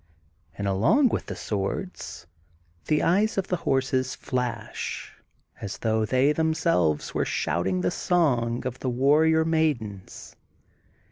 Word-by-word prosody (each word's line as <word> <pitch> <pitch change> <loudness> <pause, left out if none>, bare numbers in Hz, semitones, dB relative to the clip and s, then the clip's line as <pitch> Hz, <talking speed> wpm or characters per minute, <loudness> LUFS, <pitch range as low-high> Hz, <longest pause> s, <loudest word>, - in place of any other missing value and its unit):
And 100 - -2
along 115 - +3
with - - -3
the - - -5
swords, 95 - -4 0.6
the 150 -1 +1
eyes 205 +6 +2
of 195 - -1
the 180 - +1
horses 130 -1 0
fla^ 125 -3 -3 0.9
as 100 0 -5
though 110 -1 0
they 130 +6 +3
themselves 155 - +1
were - - +1
shouting 90 +1 -1
the 90 - 0
song 125 -10 +1
of 130 0 -4
the 130 - -2
warrior 155 +6 +3
maidens. 140 - -2
130 Hz, 125 wpm, -26 LUFS, 105-160 Hz, 0.9 s, along